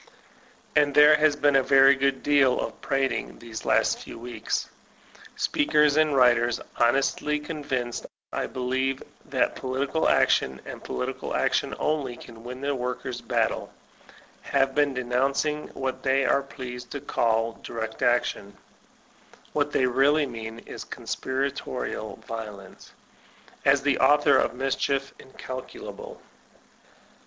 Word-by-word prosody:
And 145 -1 +3
there 150 +1 +8
has 150 -1 +3
been 145 -1 +3
a - - +4
very 135 +1 +6
great 135 0 0
deal 140 -3 +4
of - - -5
prating 135 -1 -1
these 115 -2 -8
last - - +2
few - - -9
weeks. 115 -2 -3 0.7
Speakers 150 0 +2
and 155 -2 +3
writers, 120 -2 +4 0.2
honestly 135 +5 +2
con 150 0 -6
vinced, 125 -4 -3 0.3
I - - -1
believe, 130 +1 -2 0.2
that - - 0
political 135 +4 -1
action, 65 0 +2
and - - -8
political 65 0 -4
action - - 0
only, 140 -5 -1
can 115 -1 -13
win 125 +2 -7
the 140 0 0
workers' 125 -1 -4
battle, 115 - -1 0.7
have 135 -1 +1
been 145 -1 +2
denouncing 135 +4 0
what 130 -1 -3
they 135 0 +2
are 140 - +3
pleased 125 -3 -8
to 145 - -3
call 115 -4 0
"direct 110 -1 -5
action" 120 -4 0 1.0
(what 145 -1 0
they 130 - +2
really 140 +4 +3
mean 115 -3 -7
is - - -7
coaspiratical 130 -4 -4
violence) 105 -4 -8 0.7
as 140 0 +4
the 145 -2 +2
author 145 0 +5
of - - 0
mischief 135 +1 -1
incalculable. 130 -1 -8
130 Hz, 130 wpm, -26 LUFS, 120-140 Hz, 1.0 s, there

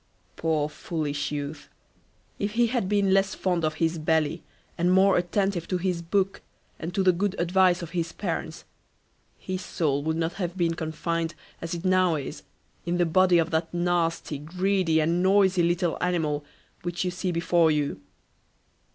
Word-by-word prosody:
Poor 155 -2 0
foolish 150 -1 -3
youth, 145 0 -5 0.7
if 205 +1 -2
he 240 +1 +3
had 230 -5 -1
been 200 -2 +3
less 195 0 +2
fond 180 -3 0
of 155 -1 0
his 165 +1 0
belly, 160 +1 +1 0.3
and 175 +1 +1
more 190 +1 +5
attentive 180 0 0
to 185 - 0
his 180 -1 -1
book, 195 +3 0 0.4
and 165 - -4
to 195 - +2
the 185 - +6
good 190 +3 -1
advice 180 0 +3
of 165 - -7
his 170 -2 -2
parents, 170 -3 -4 0.7
his 185 0 -5
soul 145 -4 0
would 160 +2 -1
not 165 +1 -1
have 180 -1 -4
been 170 -2 +1
confined 165 +1 -3 0.3
as 165 +1 -3
it 170 +2 -7
now 185 -2 +3
is, 140 -3 -5 0.4
in 175 +1 -1
the 175 - +3
body 180 +2 +4
of 165 0 +1
that 160 0 0
nasty, 170 -4 0
greedy, 180 +1 +1
and 165 +3 +1
noisy 190 -1 +4
little 175 0 +1
animal 160 -5 0 0.4
which 175 +1 -3
you 180 - 0
see 180 +1 -2
before 170 -1 +3
you. 150 -8 -1
170 Hz, 170 wpm, -26 LUFS, 160-185 Hz, 0.7 s, the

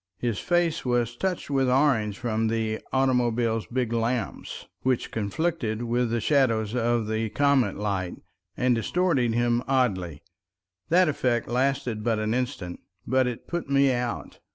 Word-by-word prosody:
His 115 -1 -2
face 175 -2 +1
was 120 -2 0
touched 180 0 -2
with 135 -2 +2
orange 125 -7 +2
from 115 -2 -1
the 110 -1 -1
automobile's 120 -4 +1
big 120 -2 -1
lamps, 115 -2 -2 0.2
which 130 -2 0
conflicted 115 +1 -2
with 120 0 0
the 115 +1 0
shadows 115 -4 +2
of 120 -1 +1
the 110 +1 -1
comet 140 -5 +2
light, 100 -3 -2 0.4
and 125 0 +3
distorted 125 - +1
him 120 0 +2
oddly. 95 - 0 0.7
That 180 +2 +5
effect 125 -5 0
lasted 125 -3 0
but 115 -1 +1
an 110 +1 -1
instant, 125 -8 -3 0.3
but 130 0 +2
it 120 -2 -5
put 170 -4 -4
me 140 -1 +4
out. 120 -1 -3
120 Hz, 145 wpm, -26 LUFS, 110-130 Hz, 0.7 s, That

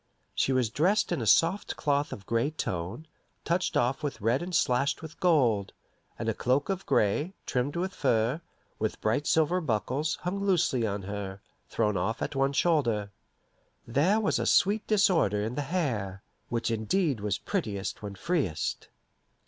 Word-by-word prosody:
She - - +1
was 125 -4 +1
dressed 190 - +2
in - - 0
a 110 - -2
soft 170 - +3
cloth 145 -1 0
of - - -6
a - - -35
gray 115 +4 +1
tone, 95 - -4 0.4
touched 175 +2 0
off 125 +3 +1
with 140 -6 -3
red 115 +5 +1
and 175 0 -3
slashed 135 +4 +1
with 160 -1 -10
gold, 120 - +2 0.4
and - - -4
a - - +2
cloak 135 +6 0
of 195 0 -3
gray, 145 - +1
trimmed 130 +4 -1
with 185 +2 -2
fur, 125 +2 +1 0.4
with 110 0 -2
bright 115 +7 0
silver 160 +3 +2
buckles, 140 +3 -1
hung 195 +3 -2
loosely 170 - +2
on 100 -1 -3
her, 100 0 -5 0.3
thrown 105 -2 0
off 100 +6 -1
at - - -4
one 135 +1 +1
shoulder. 120 -11 +1 0.7
There 155 - +2
was 220 - +1
a - - -1
sweet 205 +3 +3
disorder 170 - +3
in 110 +3 -3
the 145 - -2
hair, 110 - -2 0.3
which 115 -1 -1
indeed 125 - 0
was 105 -1 -1
prettiest 105 - -3
when 100 -2 -6
freest. 150 - -2
135 Hz, 165 wpm, -28 LUFS, 110-170 Hz, 0.7 s, soft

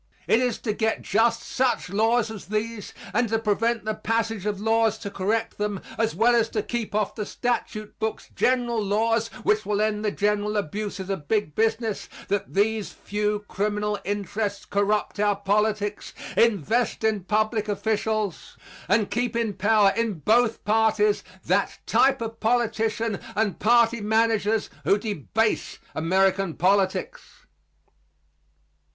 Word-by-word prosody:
It 225 - +4
is 250 -3 0
to 215 - -1
get 220 +1 -1
just 230 +1 +2
such 250 -8 0
laws 225 +2 +2
as 215 -3 -9
these 215 +1 -3 0.2
and 240 -2 +1
to 225 - +2
prevent 225 +1 0
the 215 - 0
passage 225 -1 -1
of 205 -2 -2
laws 225 0 +2
to 200 - -7
correct 215 +4 -1
them, 205 -2 -1 0.2
as 225 0 0
well 235 +2 +4
as 230 -1 +2
to 215 -2 -2
keep 230 -3 -4
off 210 -1 0
the 215 - -4
statute 215 -1 -3
books 220 0 -3
general 240 -3 +1
laws 225 +3 +1 0.2
which 425 +1 +2
will 205 -1 -1
end 215 0 0
the 210 - +2
general 210 +1 0
abuses 200 +1 -3
of 155 -7 -4
big 205 -8 0
business 225 +1 -1 0.2
that 200 0 -2
these 215 +1 +1
few 210 0 -2
criminal 210 0 -1
interests 205 0 -3
corrupt 205 +1 0
our 205 -1 +3
politics, 205 +1 -1 0.2
invest 225 - +2
in 215 -3 +1
public 215 +1 0
officials 215 -1 -2 0.3
and 205 +1 +2
keep 240 0 -1
in 230 -3 0
power 205 0 +3
in 230 -2 0
both 225 - +2
parties 220 - +2 0.2
that - - +1
type 270 -1 +3
of 225 0 -6
politicians 225 -2 0 0.2
and 210 -2 0
party 235 0 +4
managers 220 0 +1 0.2
who 200 - +3
debase 215 - -1 0.2
American 190 +1 +1
politics. 200 - 0
215 Hz, 145 wpm, -25 LUFS, 205-225 Hz, 0.3 s, It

